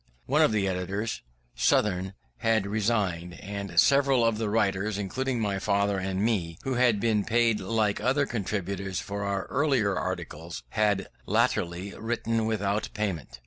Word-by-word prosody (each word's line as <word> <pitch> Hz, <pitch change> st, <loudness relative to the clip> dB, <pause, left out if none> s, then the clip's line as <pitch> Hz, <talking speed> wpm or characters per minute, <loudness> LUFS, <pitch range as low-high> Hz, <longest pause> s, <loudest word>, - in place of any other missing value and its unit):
One -, -, +3 dB
of -, -, +5 dB
the 105 Hz, -2 st, +1 dB
editors, 95 Hz, +4 st, -2 dB, 0.3 s
Southern, 90 Hz, -, +1 dB, 0.2 s
had 110 Hz, -3 st, +2 dB
resigned; 100 Hz, -5 st, -1 dB
and 100 Hz, -3 st, -2 dB
several 135 Hz, +1 st, +4 dB
of 115 Hz, -1 st, +1 dB
the 110 Hz, -2 st, -1 dB
writers, 100 Hz, -1 st, +1 dB
including 125 Hz, +5 st, -2 dB
my 100 Hz, -3 st, -1 dB
father 100 Hz, 0 st, +1 dB
and 95 Hz, +1 st, -1 dB
me, 90 Hz, -8 st, 0 dB
who 135 Hz, -, -1 dB
had 120 Hz, -4 st, +3 dB
been 110 Hz, -2 st, +2 dB
paid 115 Hz, 0 st, +2 dB
like 105 Hz, +1 st, 0 dB
other 135 Hz, +5 st, +2 dB
contributors 100 Hz, -4 st, -3 dB
for 100 Hz, 0 st, -4 dB
our 100 Hz, -1 st, -1 dB
earlier 130 Hz, -9 st, +1 dB
articles, 85 Hz, -6 st, -5 dB
had 105 Hz, -, +1 dB, 0.2 s
latterly 90 Hz, +3 st, 0 dB
written 115 Hz, -1 st, -1 dB
without 105 Hz, -1 st, -1 dB
payment. 85 Hz, -, -3 dB
100 Hz, 145 wpm, -27 LUFS, 95-115 Hz, 0.3 s, of